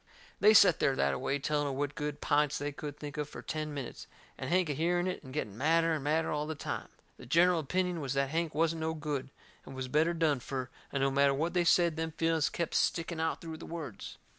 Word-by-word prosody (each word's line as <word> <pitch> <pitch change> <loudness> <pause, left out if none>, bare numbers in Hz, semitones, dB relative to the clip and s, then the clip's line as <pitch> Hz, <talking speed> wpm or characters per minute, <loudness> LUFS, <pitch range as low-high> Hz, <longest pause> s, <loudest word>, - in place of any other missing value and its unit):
They 215 +1 +6
set 190 -5 +7
there 135 - +2
that - - +2
a - - -3
way 135 +2 0
telling 145 +1 0
of 135 - -2
what 145 +1 -2
good 150 0 -4
pints 150 -1 +2
they 145 0 -3
could 145 0 -7
think 145 -1 -7
of 150 -1 -3
fur - - -9
ten 155 -1 -3
minutes, 140 -4 -6 0.3
and - - -5
Hank 180 0 +3
a 150 - -1
hearing 175 +4 +1
it 185 0 -3
and 130 - -10
getting 110 -8 -3
madder 165 +6 +3
and 150 -3 -2
madder 155 +3 +1
all 150 0 -1
the 160 - -3
time. - - -4 0.3
The - - -12
gineral 170 +5 +4
opinion 180 +3 -1
was 135 -1 -3
that 135 0 +1
Hank 165 -1 -1
wasn't 165 +1 +1
no 160 0 -1
good 150 -3 -3 0.3
and 135 - -10
was 130 -1 -4
better 155 +5 +2
done 155 -4 +2
fur, 130 0 -4 0.2
and 140 -1 0
no 135 - +2
matter 140 0 +3
what 165 +5 -1
they 175 -1 +3
said 170 -2 +4
them 160 0 -2
feelings 165 -2 +1
kep' 170 -2 -3
sticking 165 -1 0
out 160 0 -1
through 160 -1 -6
the - - -10
words. 160 -10 -7
150 Hz, 245 wpm, -31 LUFS, 140-165 Hz, 0.3 s, set